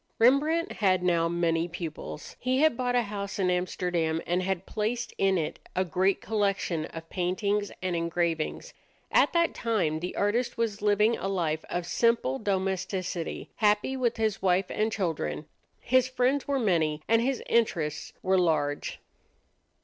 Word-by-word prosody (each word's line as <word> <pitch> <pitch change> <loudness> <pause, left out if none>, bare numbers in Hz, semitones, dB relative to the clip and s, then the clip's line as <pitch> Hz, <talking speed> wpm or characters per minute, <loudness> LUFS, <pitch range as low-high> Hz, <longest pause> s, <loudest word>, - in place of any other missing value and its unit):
Rembrandt 300 +9 +3
had 185 -3 +2
now 170 -2 +2
many 170 -1 +1
pupils. 165 -3 -7
He 255 +1 0
had 310 -1 +4
bought 245 0 0
a 245 - +3
house 200 -1 -5
in 185 -2 +2
Amsterdam, 180 -2 0
and 175 +1 +1
had 190 0 -2
placed 230 +3 -2
in 195 -1 +3
it 160 -3 -3 0.2
a 185 - +1
great 185 +3 +1
collection 195 -6 0
of 165 0 -9
paintings 200 +3 0
and 185 -1 0
engravings. 170 -1 -1 0.4
At - - +4
that 335 -1 +2
time 185 -10 0
the 180 +2 -5
artist 230 +5 0
was 225 -3 -1
living 210 +2 +3
a - - -2
life 165 -5 -1
of 175 0 -2
simple 200 - +1
domesticity, 185 -2 -2
happy 210 +4 +2
with 240 -3 0
his 220 -2 0
wife 185 0 +2
and 215 +1 0
children. 160 - -2 0.3
His 255 +1 +2
friends 260 +2 +1
were 280 -1 +1
many, 160 - +1
and 230 0 +4
his 260 +1 -1
interests 160 -10 0
were 190 0 +3
large. 150 -4 0
190 Hz, 155 wpm, -28 LUFS, 170-225 Hz, 0.4 s, had